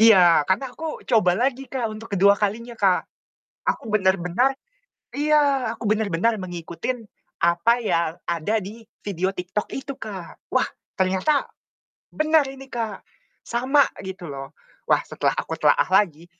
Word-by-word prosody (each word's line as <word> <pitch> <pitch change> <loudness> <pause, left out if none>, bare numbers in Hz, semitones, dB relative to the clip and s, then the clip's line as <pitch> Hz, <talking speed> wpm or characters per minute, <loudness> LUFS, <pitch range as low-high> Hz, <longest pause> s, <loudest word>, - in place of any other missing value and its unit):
Iya, 180 -9 +7
karena 250 +7 0
aku 320 +2 -6
coba 210 -7 +3
lagi 265 +3 0
Kak, 255 -4 -2
untuk 220 +1 -9
kedua 200 +1 +6
kalinya 230 +3 -2
Kak. 190 -3 +3 0.7
Aku - - -13
benar-benar 195 +6 +2 0.6
iya, 285 -5 +2
aku 230 - -9
benar-benar 215 +1 +1
mengikuti 175 +1 -5 0.5
apa 170 +7 +4
yang 170 -6 0
ada 170 +6 0
di 210 +5 -9 0.2
video 190 -1 0
TikTok 185 +2 -3
itu, 270 +1 -5
Kak. 190 -8 -8
Wah - - +2 0.3
ternyata 190 +11 +2 0.6
benar 310 -1 +3
ini 270 0 -10
Kak, 225 -6 -4 0.4
sama, 260 +4 +3 0.2
gitu 190 -2 -7
loh. 135 -1 -7 0.4
Wah - - +4
setelah - - -1
aku - - -2
telaah - - +4
lagi, 175 -4 +2
210 Hz, 135 wpm, -23 LUFS, 180-250 Hz, 0.7 s, Iya